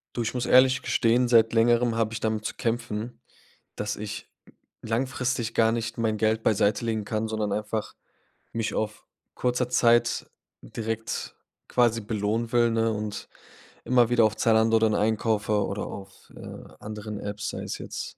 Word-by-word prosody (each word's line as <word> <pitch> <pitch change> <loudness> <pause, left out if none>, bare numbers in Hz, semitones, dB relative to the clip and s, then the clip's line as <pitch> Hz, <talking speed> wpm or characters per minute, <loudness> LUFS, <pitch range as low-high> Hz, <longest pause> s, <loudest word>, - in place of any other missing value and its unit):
Du, 120 - -1
ich 115 - -2
muss 125 -1 -2
ehrlich 130 +1 +5
gestehen, 120 +1 +2
seit 115 -1 +5
Längerem 120 0 +3
habe 115 -1 0
ich 115 - -3
damit 110 -1 -1
zu - - -4
kämpfen, 115 0 -3 0.6
dass 105 0 -2
ich 105 0 -7 0.5
langfristig 125 0 -1
gar 110 -1 +3
nicht 115 0 -3
mein 110 -2 0
Geld 110 +1 +1
beiseitelegen 110 +1 +1
kann, 110 +1 -2
sondern 110 -2 -1
einfach 105 0 -3 0.6
mich 115 -1 -2
auf 110 0 -3 0.3
kurzer 125 0 0
Zeit 120 -1 +3 0.3
direkt 115 - -4 0.4
quasi 120 -2 +2
belohnen 110 +2 -2
will, 120 -1 +3
ne, 115 0 +1
und 105 -1 -5 0.6
immer 120 -2 +4
wieder 120 -2 +4
auf 110 0 +1
Zalando 110 0 +4
dann 110 -1 +2
einkaufe 105 -1 +1
oder 100 - -4
auf, 95 -1 -11
äh, - - -9 0.2
anderen 105 0 -6
Apps, 105 +1 -4
sei - - -5
es - - -4
jetzt - - -7
115 Hz, 155 wpm, -26 LUFS, 110-120 Hz, 0.6 s, ehrlich